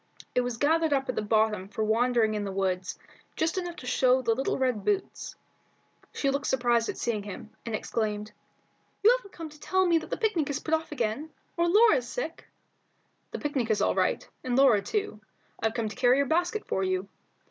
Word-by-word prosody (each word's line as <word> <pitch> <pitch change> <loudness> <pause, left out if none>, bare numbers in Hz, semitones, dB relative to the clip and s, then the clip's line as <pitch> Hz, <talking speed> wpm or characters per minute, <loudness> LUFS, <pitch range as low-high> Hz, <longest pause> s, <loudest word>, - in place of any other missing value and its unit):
It 250 - +3
was 245 -2 -3
gathered 315 +3 +2
up 270 -1 0
at 255 - -1
the - - 0
bottom 210 -2 +1
for 210 +2 -3
wandering 225 0 +2
in 210 -1 -2
the 200 - -3
woods, 190 -1 -2 0.4
just 320 +3 0
enough 350 -2 -5
to 255 - -10
show 255 +1 +3
the 230 - +2
little 265 +4 -1
boots. 260 - -1 0.8
She 275 - 0
looked 280 0 -2
surprised 240 -3 +2
at - - -4
seeing 225 -3 -1
him, 205 +1 -9 0.2
and 225 - -1
exclaimed 215 -1 -2 0.7
"You 440 - +8
haven't 400 -6 -9
come 325 -2 -7
to 300 0 -16
tell 375 +4 +1
me 340 -2 +4
that 315 - -10
the - - -2
picnic 365 -10 0
is 285 - -1
put 320 - -4
off 320 0 0
again, 255 +3 -2 0.3
or 340 0 +2
Laura's 345 - +5
sick?" - - -5 0.8
"The - - -5
picnic 275 -6 -2
is 215 - +2
all - - +2
right, - - 0 0.2
and 250 -1 -1
Laura 260 -6 +5
too. 410 - -3 0.4
I've 225 0 0
come 230 -2 -1
to 215 - -9
carry 250 +1 +4
your 280 - +3
basket 350 +8 0
for 190 - -1
you." 185 +1 -1
250 Hz, 200 wpm, -28 LUFS, 220-320 Hz, 0.8 s, You